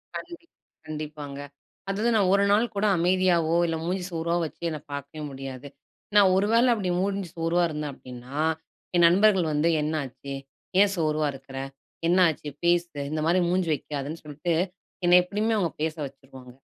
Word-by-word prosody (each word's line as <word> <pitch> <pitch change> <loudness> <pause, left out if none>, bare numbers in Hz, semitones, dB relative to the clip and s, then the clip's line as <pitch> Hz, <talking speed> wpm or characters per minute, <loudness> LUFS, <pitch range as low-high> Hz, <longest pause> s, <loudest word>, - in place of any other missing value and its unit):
கண்டிப் 340 -1 -8 0.4
கண்டிப்பாங்க. 150 -2 -6 0.5
அதாவது 215 +4 +1
நான் 200 -4 +3
1 200 0 +4
நாள் 215 +4 +4
கூட 200 +1 +1
அமைதியாவோ 175 -2 +2
இல்ல 165 - -1
மூஞ்சி 180 +1 -1
சோர்வா 170 +1 -1
வச்சு 155 - -10
என்ன 155 -2 -4
பார்க்கவே 145 +2 -6
முடியாது. 135 0 -7 0.5
நான் 195 -2 +7
ஒரு 195 +2 +2
வேள 235 +2 +5
அப்டி 195 -5 -2
மூஞ்சி 195 -1 -1
சோர்வா 165 +2 +1
இருந்தேன் 150 -2 -4
அப்டின்னா, 125 +2 -9 0.6
என் 175 -1 +6
நண்பர்கள் 190 0 +4
வந்து 150 +3 +2
என்னாச்சு? 140 -3 -4 0.5
ஏன் 200 0 +5
சோர்வா 155 -2 +1
இருக்கற? 135 0 -10 0.5
என்ன 175 +2 +3
ஆச்சு? 150 -1 -5
பேசு 170 -3 +1
இந்த 155 - -2
மாரி 175 +3 +3
மூஞ்சி 180 -2 +1
வைக்காதன்னு 145 +2 -6
சொல்ட்டு, 150 +4 -2 0.5
என்னை 175 0 +6
எப்டியுமே 210 +4 0
அவங்க 175 -6 0
பேச 160 -1 -1
வச்சுருவாங்க. 130 -2 -12
165 Hz, 155 wpm, -26 LUFS, 145-185 Hz, 0.6 s, நான்